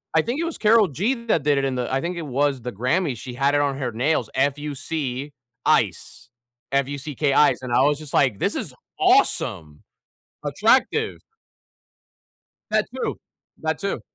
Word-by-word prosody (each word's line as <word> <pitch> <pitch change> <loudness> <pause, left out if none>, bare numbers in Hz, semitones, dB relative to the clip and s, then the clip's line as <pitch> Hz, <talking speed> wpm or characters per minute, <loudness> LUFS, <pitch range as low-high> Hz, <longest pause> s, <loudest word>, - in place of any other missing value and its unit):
I 160 - +6
think 255 +6 -2
it 335 - 0
was 330 - -4
Carol 215 -2 +5
G 195 - 0
that 165 -10 +2
did 145 -1 +3
it 135 - 0
in 135 - -1
the 125 +1 -2
I 135 - +1
think 175 +1 -3
it - - -3
was 140 -1 0
the 125 - -4
Grammy, 130 - 0
she 125 +1 -8
had 140 +2 +2
it 145 - +3
on 140 -2 0
her 125 -3 -2
nails, 125 +1 0
F-U-C 145 0 -2 0.3
ICE, - - 0 0.4
F 140 -1 +2
U-C-K 145 0 -2
ICE, 150 - +4
and 125 -2 -6
I - - +4
was 145 +1 +2
just 155 -3 -10
like, 125 -8 +3
"This - - 0
is - - -4 0.3
awesome." 75 -1 +2 0.6
Attractive. 230 - +2 1.5
That - - +2
too, 465 - -3 0.4
that - - -1
too. - - -3
145 Hz, 175 wpm, -23 LUFS, 130-160 Hz, 1.5 s, I